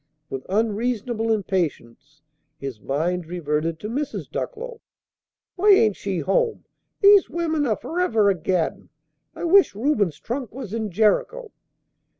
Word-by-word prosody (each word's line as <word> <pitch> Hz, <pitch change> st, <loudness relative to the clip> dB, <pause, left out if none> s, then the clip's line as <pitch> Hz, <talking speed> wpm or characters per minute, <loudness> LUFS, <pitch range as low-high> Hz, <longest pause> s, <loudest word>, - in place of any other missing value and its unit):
With 135 Hz, -1 st, -6 dB
unreasonable 225 Hz, +2 st, 0 dB
impatience, 150 Hz, -, -3 dB, 0.3 s
his 135 Hz, -6 st, -6 dB
mind 165 Hz, +5 st, -1 dB
reverted 160 Hz, -1 st, -2 dB
to 210 Hz, -, -4 dB
Mrs. 275 Hz, +6 st, -3 dB
Ducklow. 475 Hz, 0 st, -5 dB, 0.8 s
"Why 405 Hz, +3 st, +6 dB
ain't 220 Hz, -, +4 dB
she 195 Hz, -2 st, -3 dB
to -, -, -8 dB
home? 450 Hz, -, 0 dB, 0.4 s
These 405 Hz, -1 st, +7 dB
women 320 Hz, -4 st, -1 dB
are 215 Hz, -, +2 dB
forever 280 Hz, -, +1 dB
a 200 Hz, -, +5 dB
gaddin'! 175 Hz, 0 st, -2 dB, 0.5 s
I -, -, -7 dB
wish 360 Hz, -, +5 dB
Reuben's 210 Hz, -, 0 dB
trunk 245 Hz, -1 st, -4 dB
was 245 Hz, -7 st, -7 dB
in 220 Hz, -2 st, -2 dB
Jericho!" 225 Hz, -, +1 dB
215 Hz, 135 wpm, -23 LUFS, -, 0.8 s, These